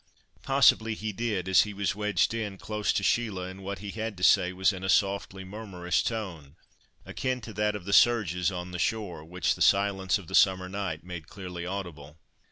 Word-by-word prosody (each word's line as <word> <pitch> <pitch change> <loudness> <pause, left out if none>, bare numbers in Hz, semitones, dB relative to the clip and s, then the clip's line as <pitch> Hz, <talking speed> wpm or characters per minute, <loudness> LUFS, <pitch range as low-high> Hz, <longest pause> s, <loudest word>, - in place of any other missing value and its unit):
Possibly 115 -5 +4
he 110 0 -4
did, 105 -4 -2
as 95 - +6
he 105 -1 -3
was 100 0 0
wedged 105 -3 +1
in, 105 -4 -4
close 105 +1 -1
to 100 - -1
Sheila, 105 -4 0
and 95 +1 -9
what 100 +1 -4
he 100 - -4
had 110 -2 -4
to 90 - -7
say 90 -1 +5
was 95 +2 +2
in 95 0 -7
a 95 - -2
softly, 95 0 +1
murmurous 95 -3 -2
tone; 85 -11 -5 0.5
akin 130 -1 -2
to 110 0 -9
that 105 +1 0
of 95 -4 -7
the 100 - -2
surges 100 -7 +4
on 90 0 -6
the 90 - -5
shore, 95 -7 -2
which 90 +3 -1
the - - -10
silence 100 -1 +3
of 100 - -11
the - - -11
summer 95 -1 +4
night 95 -4 -4
made 85 -3 -8
clearly 90 -3 -7
audible. 85 -6 -6
95 Hz, 200 wpm, -28 LUFS, 90-105 Hz, 0.5 s, as